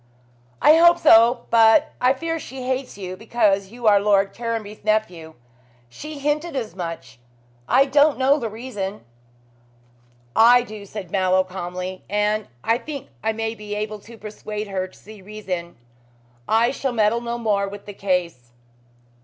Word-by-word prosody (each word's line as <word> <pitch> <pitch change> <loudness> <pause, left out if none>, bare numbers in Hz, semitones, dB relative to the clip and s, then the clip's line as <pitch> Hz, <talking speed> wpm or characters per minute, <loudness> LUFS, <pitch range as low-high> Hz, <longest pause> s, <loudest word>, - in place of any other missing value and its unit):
"I 310 - +7
hope 340 +1 +6
so; 235 -5 +5
but 230 +7 +5
I 250 +1 +4
fear 330 +4 -3
she 265 -3 -8
hates 260 -2 -3
you 185 -2 -6
because 205 -2 +1
you 235 +3 -10
are 205 -2 +6
Lord 200 -1 +2
Caranby's 225 -3 -5
nephew. 180 -7 -1 0.5
She 300 - -9
hinted 295 +3 -2
as 225 -9 -4
much. 165 -8 -7 0.5
I 265 +2 +5
don't 290 +2 +3
know 275 +3 +3
the 230 -4 -3
reason." 210 - -6 1.3
"I 240 +2 +6
do," 210 -3 -10
said 190 -4 -8
Mallow 185 -1 +2
calmly, 185 0 -6
"and 210 +1 0 0.2
I 230 +1 +1
think 285 -3 -8
I 220 - +1
may 225 0 -3
be 210 -2 -7
able 215 0 -4
to 230 +3 -14
persuade 210 0 -7
her 185 -1 -2
to 185 - -20
see 215 -1 -14
reason. 185 -4 -6 0.7
I 230 +2 +3
shall 270 -1 -3
meddle 220 +1 +2
no 235 0 -4
more 205 -4 0
with 200 0 -9
the 205 - -8
case." 180 -11 -2
215 Hz, 155 wpm, -22 LUFS, 195-245 Hz, 1.3 s, I